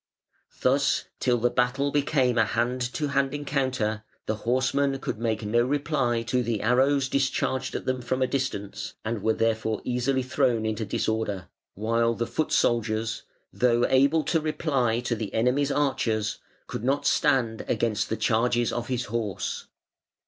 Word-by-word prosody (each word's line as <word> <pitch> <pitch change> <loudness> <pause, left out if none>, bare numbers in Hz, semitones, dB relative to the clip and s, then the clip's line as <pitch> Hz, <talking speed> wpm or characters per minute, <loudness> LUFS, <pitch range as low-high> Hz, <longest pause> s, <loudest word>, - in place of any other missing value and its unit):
Thus - - +2
till 125 -1 +2
the 120 +1 +1
battle 130 +3 +1
became 140 -4 +2
a - - +6
hand 125 +3 -1
to 150 -2 -1
hand 135 0 +1
encounter 130 -7 -1 0.2
the 110 - -2
horsemen 135 +2 +2
could 120 - -4
make 110 -2 -1
no 115 +3 +2
reply 135 -3 0
to 125 +2 0
the 115 -3 -2
arrows 135 +4 +3
discharged 130 -1 -1
at - - -4
them 130 -1 -1
from 130 +2 0
a - - +4
distance, 125 -7 -3
and 110 -1 -2
were 110 +2 +1
therefore 110 -1 0
easily 125 +2 0
thrown 130 -3 +1
into 110 0 -2
disorder, 105 -2 -2 0.3
while 115 +2 +1
the 120 - -1
foot 120 +7 -2
soldiers, 110 -1 +1 0.3
though 120 -1 +3
able 140 +4 +4
to 165 - +1
reply 140 -7 0
to 120 - -1
the 110 -2 -4
enemy's 130 +5 +2
archers, 115 -7 0 0.3
could - - -6
not 135 +3 +1
stand 115 -4 +2
against 110 -2 0
the 110 - -1
charges 120 +2 +1
of 120 0 -3
his 125 -2 -1
horse". 110 -5 -3
120 Hz, 155 wpm, -26 LUFS, 110-135 Hz, 0.3 s, a